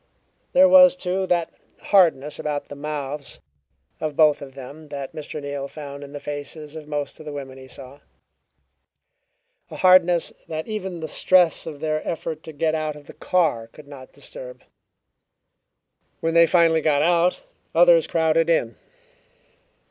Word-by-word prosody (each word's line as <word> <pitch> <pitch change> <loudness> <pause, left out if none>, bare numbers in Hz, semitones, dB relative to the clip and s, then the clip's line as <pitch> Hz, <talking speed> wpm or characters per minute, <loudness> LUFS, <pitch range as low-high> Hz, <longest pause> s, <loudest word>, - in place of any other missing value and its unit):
There 280 +1 +7
was, 275 -1 +7
too, 190 -6 -2
that 170 -2 0 0.3
hardness 160 -7 +2
about 150 -1 -4
the 145 - -8
mouths 145 -1 -6 0.6
of 155 -2 -4
both 150 -1 +4
of 135 -1 -10
them 140 +4 -11
that 140 -2 -7
Mr. 155 0 -7
Neal 140 -1 -5
found 140 -1 -9
in 140 - -11
the 145 - -7
faces 145 +1 -8
of 155 -2 -9
most 145 -1 -4
of 155 - -12
the - - -5
women 135 -2 -8
he 130 - -13
saw 135 +2 -12 1.7
a - - -9
hardness 180 -2 +4
that 155 0 -5
even 190 -6 -5
the 160 - -4
stress 175 0 +3
of 150 -3 -8
their 155 -1 -1
effort 160 -1 -4
to 160 - -8
get 155 +1 -1
out 155 -1 -2
of 150 -1 -14
the - - -13
car 160 -11 0
could 145 +5 -16
not 135 -2 -12
disturb. - - -11 1.6
When 165 -2 -1
they 170 0 +6
finally 165 -1 +3
got 150 -2 +2
out, 175 +1 +2 0.4
others 170 -1 +5
crowded 165 0 +1
in. 120 -8 0
155 Hz, 155 wpm, -22 LUFS, 145-170 Hz, 1.7 s, There